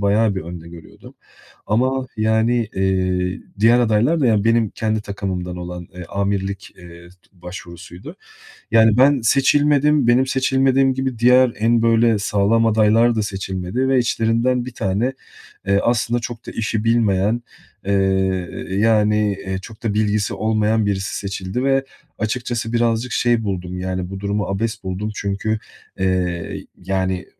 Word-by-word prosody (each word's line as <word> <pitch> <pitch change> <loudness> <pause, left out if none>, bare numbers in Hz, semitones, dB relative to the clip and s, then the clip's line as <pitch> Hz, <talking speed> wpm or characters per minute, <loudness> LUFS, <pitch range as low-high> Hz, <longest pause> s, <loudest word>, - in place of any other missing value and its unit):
bayağı 105 +1 +2
bir 95 - -3
önde 85 0 -9
görüyordum 85 -1 -14 0.5
ama, 130 +4 0
yani, 110 +1 +1
eee, 95 -1 0 0.2
diğer 115 +3 +5
adaylar 120 +8 +2
da, 140 - +2
yani, 105 -3 +2
benim 115 -1 +2
kendi 110 +1 -2
takımımdan 95 -3 -4
olan, 90 -1 -7
eee, 90 -1 -7
amirlik, 100 +1 -3
eee, 85 -1 -13
t 90 - -20 0.3
başvurusuydu. 90 - -10 0.6
Yani, 110 -1 +5
ben 135 0 +5
seçilmedim. 145 +2 +3
Benim 125 +2 +4
seçilmediğim 135 0 +2
gibi 130 -3 -3
diğer 125 0 +5
en 115 +1 +2
böyle 115 -1 +3
sağlam 105 +3 +2
adaylar 115 +3 +4
da 110 - +1
seçilmedi 95 +4 -3
ve 135 -1 +3
içlerinden 120 +1 +1
1 125 - -7
tane, 110 +6 -1 0.5
eee, 100 0 +3
aslında 120 0 +1
çok 120 0 -7
da - - -6
işi 110 0 -2
bilmeyen, 115 0 +2 0.4
eee, 100 - 0 0.8
yani, 105 0 +2
eee, 95 0 -2
çok 110 +4 -12
da 110 -3 -1
bilgisi 105 -2 0
olmayan 110 +1 +1
birisi 95 -1 -2
seçildi 100 +4 -4
ve 135 0 +2 0.3
açıkçası 115 +1 -3
birazcık 115 +1 0
şey 120 -2 +1
buldum, 90 -2 -4
yani, 90 0 -3
bu 95 - -6
durumu 100 0 -1
abes 105 +1 -3
buldum. 95 +3 -3
Çünkü, 105 +2 -2 0.4
eee, 90 -2 -2 0.2
yani, 95 -1 -1
110 Hz, 140 wpm, -20 LUFS, 95-120 Hz, 0.8 s, diğer